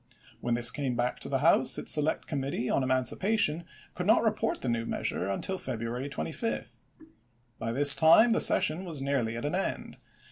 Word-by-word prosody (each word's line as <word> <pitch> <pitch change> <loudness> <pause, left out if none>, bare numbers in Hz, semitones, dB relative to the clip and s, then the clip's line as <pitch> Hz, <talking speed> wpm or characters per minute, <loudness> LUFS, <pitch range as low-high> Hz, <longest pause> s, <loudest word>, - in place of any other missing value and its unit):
When 120 -1 -2
this 120 -1 +6
came 135 -4 -4
back 120 +1 -3
to - - -5
the - - -1
House - - +4
its - - +1
select 150 +1 +2
committee 135 -4 -4
on - - 0
emancipation 150 - 0 0.3
could 180 +1 -5
not 220 - +3
report 220 0 -2
the - - -5
new 115 -1 -2
measure 95 -4 -4
until 185 - -4
February 120 +4 -6
25. 165 +10 -6 0.8
By 115 - -4
this 140 +3 +6
time 165 +9 +5
the 225 - +2
session 160 +4 +3
was 165 -6 -6
nearly 135 -5 -3
at 115 - -6
an 150 - -3
end. 190 +2 -5
140 Hz, 180 wpm, -27 LUFS, 120-175 Hz, 0.8 s, this